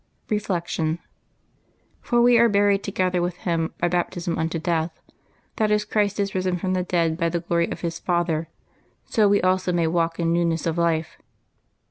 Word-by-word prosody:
Reflection. 170 -6 -1 0.4
— - - -42
" - - -40
For 240 -1 +2
we 245 0 +6
are 235 0 +5
buried 200 -1 +3
together 185 -3 0
with 175 0 -1
Him 165 -3 -1
by 175 - +1
baptism 175 0 -1
unto 165 +1 -1
death; 160 0 -2 0.6
that 215 -1 +2
as 210 0 +2
Christ 210 -1 0
is 200 -1 -1
risen 185 -1 0
from 185 +1 -2
the 185 - +1
dead 170 -2 0
by 170 -1 +1
the 170 0 -2
glory 170 0 0
of - - -6
His 170 -1 -3
Father, 170 -3 -1 0.6
so 215 -2 +3
we 200 -1 +3
also 185 0 +2
may 170 -1 +1
walk 165 0 0
in 165 0 +1
newness 170 -1 0
of 165 0 -1
life. 165 -1 0
175 Hz, 185 wpm, -23 LUFS, 165-195 Hz, 0.6 s, we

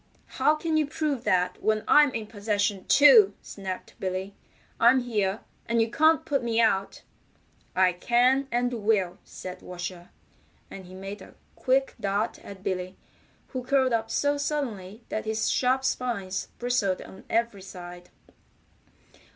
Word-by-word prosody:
"How 305 - +5
can 315 0 -1
you 305 -2 +2
prove 295 -4 -2
that 180 0 +1
when 215 0 +1
I'm 295 -2 +6
in 220 - -3
possession, 205 -2 -1
too?" 230 -9 +7
snapped 190 -2 -7
Billy. 190 +1 -3 0.5
"I'm 255 +3 +5
here, 210 -4 -1 0.3
and 230 0 +1
you 225 0 +1
can't 315 +3 +3
put 285 -5 0
me 230 -1 0
out." 200 -4 +1 0.7
"I 185 -1 +4
can, 245 +8 +2
and 245 +1 0
will," 200 -4 +1
said 185 0 -9
Washer, 175 0 -7 0.6
and 190 - -9
he 185 - -12
made 195 +2 -7
a - - -14 0.2
quick 270 +1 +1
dart 200 +2 -1
at 195 -1 -11
Billy, 185 0 -3 0.5
who 255 -1 -5
curled 260 -1 +2
up 225 -1 0
so 285 +5 +1
suddenly 230 -8 -3
that 215 - -3
his 220 0 0
sharp 260 +1 +1
spines 225 -8 -2
bristled 240 -6 0
on 190 - -13
every 230 -3 0
side. 180 -2 -10
220 Hz, 145 wpm, -26 LUFS, 190-255 Hz, 0.7 s, too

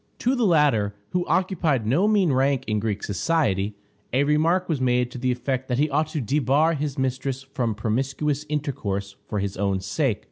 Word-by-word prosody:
To 250 - +1
the 240 -4 +2
latter, 140 - +3 0.2
who 180 -1 -1
occupied 165 - +1
no 150 - +3
mean 200 -7 +3
rank 135 0 +2
in 105 -1 0
Greek 105 -1 -2
society, 105 - 0 0.4
a 130 +3 +3
remark 160 +5 +2
was 155 -6 -1
made 125 -1 +1
to 125 - -7
the 130 0 +1
effect 130 +1 -2
that 125 - -1
he 150 +2 +1
ought 155 +3 +1
to 155 0 -3
debar 145 +6 +2
his 145 -2 -3
mistress 130 0 -2
from 125 -5 -2
promiscuous 135 +7 -1
intercourse 100 -10 -3
for 105 - -3
his 100 -1 -2
own 100 -1 0
sake. 105 +5 0
135 Hz, 185 wpm, -24 LUFS, 110-150 Hz, 0.4 s, latter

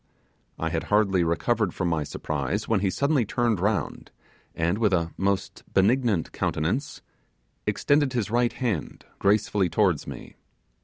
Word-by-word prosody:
I - - -2
had - - -2
hardly 100 -4 +3
recovered 95 +4 0
from 90 - -1
my 80 -3 0
surprise, 75 +7 -3
when 110 -3 +2
he 95 0 +1
suddenly 140 +4 +1
turned 115 -1 0
round, 100 +2 -1 0.5
and, 85 +5 0
with 105 -4 +2
a 85 -2 +1
most 95 -1 -1
benignant 110 -2 +2
countenance 95 - -2 0.6
extended 145 -2 +2
his 110 -4 -1
right 120 0 +2
hand 110 - -3
gracefully 100 -2 +2
towards 95 -7 +1
me. - - -9
100 Hz, 140 wpm, -26 LUFS, 90-120 Hz, 0.6 s, hardly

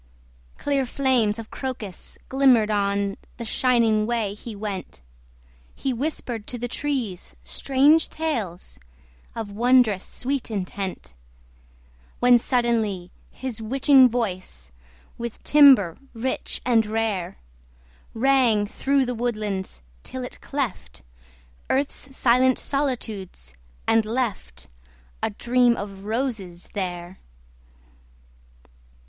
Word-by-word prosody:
Clear 275 -2 0
flames 245 -5 +2
of 225 -1 -8
Crocus 235 -8 -6
glimmered 255 -5 +4
on 200 -1 0 0.2
The 235 - -6
shining 225 -3 +2
way 230 -4 -1
he 215 +1 -9
went. 200 -2 -5 0.8
He 270 - -2
whispered 245 -4 -3
to 245 - -3
the 245 +1 -3
trees 240 - -3
strange 275 - +3
tales 200 - -3 0.6
Of 220 -3 -5
wondrous 235 -2 +3
sweet 270 0 -2
intent, 190 - -4 1.1
When, 245 0 +6
suddenly, 225 -8 0 0.2
his 245 -3 -6
witching 265 +3 +5
voice 185 - -4 0.5
With 235 -1 -6
timbre 270 - +6 0.2
rich 255 +3 -2
and 235 -3 +4
rare, 215 - -2 0.8
Rang 240 -4 +3
through 270 +5 +1
the 250 - -2
woodlands 210 - -3 0.2
till 260 - -6
it 250 - -9
cleft 265 - -4 0.7
Earth's 270 0 -2
silent 255 +1 +4
solitudes, 220 - -2 0.3
and 225 0 +4
left 220 - -3 0.5
A - - +1
Dream 240 +2 +2
of 200 -1 -7
Roses 215 -7 -3
there! 180 -2 -4
230 Hz, 100 wpm, -24 LUFS, 200-260 Hz, 1.1 s, When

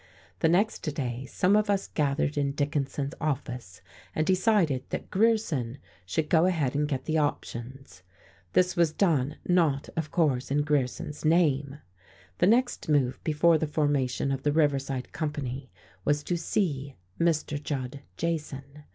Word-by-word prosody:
The 160 - +3
next 200 +6 +2
day 130 -4 -4
some 195 +8 +2
of 210 0 +2
us 200 -1 +1
gathered 145 -1 0
in 140 -1 0
Dickinson's 140 -1 -2
office 125 - -3 0.3
and 155 - +1
decided 185 - +2
that - - -5
Grierson 185 - +1 0.3
should 150 - -1
go 165 +2 +4
ahead 155 -8 0
and 145 +1 +1
get 135 -3 -3
the 160 0 +1
options. 135 -5 -4 0.5
This 180 0 +3
was 170 -3 +3
done; 155 -6 +1
not, 165 -6 +2
of 160 -2 -2
course, 140 -7 +1
in 145 +2 +2
Grierson's 145 0 -1
name. 150 -3 +2 0.6
The 175 - +4
next 245 -3 +2
move, 135 -4 +2
before 160 +1 +3
the 155 - -1
formation 145 -3 0
of 135 -1 -2
the 145 - +1
Riverside 140 -4 0
Company, 140 -4 -4 0.3
was 145 +3 +1
to 175 - -1
"see" 150 -6 -1 0.2
Mr. 155 -3 +1
Judd 135 -2 -4 0.2
Jason. 155 -5 -2
150 Hz, 145 wpm, -28 LUFS, 135-165 Hz, 0.6 s, go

